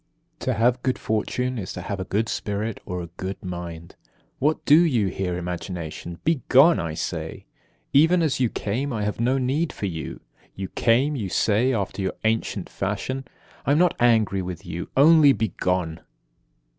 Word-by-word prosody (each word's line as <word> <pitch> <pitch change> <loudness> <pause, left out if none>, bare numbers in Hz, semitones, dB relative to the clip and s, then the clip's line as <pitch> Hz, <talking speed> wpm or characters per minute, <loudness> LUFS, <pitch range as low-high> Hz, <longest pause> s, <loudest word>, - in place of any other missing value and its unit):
17. - - -7
To - - 0
have 120 +2 +3
good 130 -1 0
fortune 125 +3 -1
is 95 - -5
to 90 - -6
have 100 0 -4
a - - -2
good 105 +4 0
spirit, 105 0 -3
or 90 -1 -3
a - - -7
good 95 +1 -5
mind. 85 -2 -7 0.4
What 150 +3 +1
do 150 +2 +7
you 120 - +2
here, 90 -1 -2
Imagination? 85 -1 -5
Be 160 -4 +1
gone, 155 +6 +6
I 80 -2 -3
say, - - -4 0.5
even 165 +5 +5
as 140 -5 0
you 125 -3 +2
came. 125 +9 -2
I 110 -3 -2
have 105 +1 -2
no 125 +3 +2
need 135 +6 0
for - - -5
you. 85 -5 -5 0.4
You 95 -1 -5
came, 130 +6 +2
you 105 -8 -3
say, 110 +8 +2
after 100 -4 -2
your 95 -1 -1
ancient 110 -3 0
fashion: 105 +7 -3 0.4
I 140 - +2
am - - +3
not 175 0 +3
angry 110 -5 +3
with 90 -2 -6
you, 85 +1 -5
only, 150 0 +7
be 110 -4 -1
gone! 90 -3 0
110 Hz, 180 wpm, -24 LUFS, 95-130 Hz, 0.5 s, do